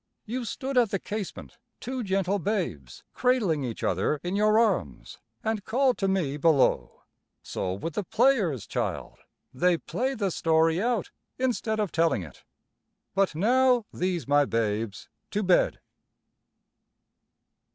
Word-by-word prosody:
You 245 +2 -4
stood 260 +3 -1
at 235 -3 +3
the 195 - 0
casement, 205 0 -6 0.2
two 255 0 -4
gentle 195 0 0
babes, 165 - -3
cradling 215 - +1
each 120 -3 -5
other 95 - 0
in 180 +2 -2
your 215 +1 +3
arms, 230 0 0 0.2
and 220 -2 -1
called 255 +4 +1
to 195 - +1
me 175 -8 0
below. 150 -3 +2 0.4
So 90 - -3
with 155 - -5
the 210 - -2
players, 200 - +2
child, - - -4 0.3
they 175 +6 +2
play 260 +9 -2
the 200 -5 -1
story 160 +1 +2
out 235 -3 -1 0.3
instead 235 -4 -1
of 210 -4 -1
telling 165 - +1
it. 75 -6 -13 0.7
But 195 -4 +1
now, 245 +5 +3
these 180 -3 -2
my 145 +1 +4
babes 110 -4 -2 0.2
to 210 - -1
bed." 185 -2 +3
195 Hz, 135 wpm, -27 LUFS, 155-225 Hz, 0.7 s, my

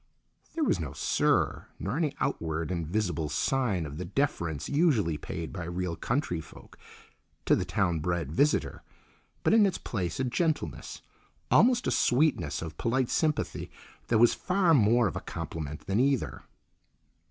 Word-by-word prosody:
There 330 - 0
was - - +2
no - - -4
"sir," - - +1
nor - - -3
any 155 -4 0
outward 80 0 -2
and 85 -3 -2
visible 85 -5 -1
sign 95 - 0
of 75 +1 -7
the - - -3
deference 85 - -1
usually 140 - +2
paid 80 +2 -6
by 90 -3 -5
real 85 0 -3
country 120 - -1
folk - - -15 0.7
to - - +5
the 90 - -1
town 90 -3 0
bred 85 -2 -2
visitor, 145 - +1 0.6
but - - +3
in 225 -1 +6
its 195 -3 +2
place 90 -4 -3
a - - +1
gentleness, 155 +5 -2 0.5
almost 245 +1 +5
a - - +1
sweetness, 120 - +2
of 80 -1 -8
polite 125 +1 0
sympathy 155 -2 -1 0.4
that 115 - +3
was 120 +1 +6
far 185 -2 +2
more 120 -2 +4
of 95 - -1
a - - -3
compliment 75 -2 -6
than 95 +3 0
either. 135 0 +1
100 Hz, 155 wpm, -29 LUFS, -, 0.7 s, in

